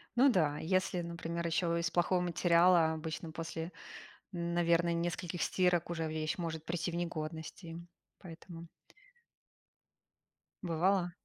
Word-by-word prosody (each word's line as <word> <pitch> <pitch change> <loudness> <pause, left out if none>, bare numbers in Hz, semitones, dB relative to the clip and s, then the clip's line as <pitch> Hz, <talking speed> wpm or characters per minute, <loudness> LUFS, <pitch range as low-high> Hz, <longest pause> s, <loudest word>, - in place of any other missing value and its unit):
Ну 265 +3 +6
да. 155 - +2
Если, 185 +1 +1
например, 170 0 -4
еще 170 0 +1
из 170 -1 -1
плохого 175 +1 +2
материала, 170 -1 +4
обычно 160 +1 -5
после, 165 +1 -5 0.6
наверное, 170 -1 +2
нескольких 170 +1 -2
стирок 180 -2 +2
уже 165 -2 -2
вещь 155 0 -2
может 160 -2 -4
прийти 170 +1 -2
в - - -6
негодность 160 0 -4
и 165 0 -7 0.4
поэтому 170 -1 -10 2.0
Бывало? 175 +1 +1
170 Hz, 115 wpm, -33 LUFS, 165-175 Hz, 2.0 s, Ну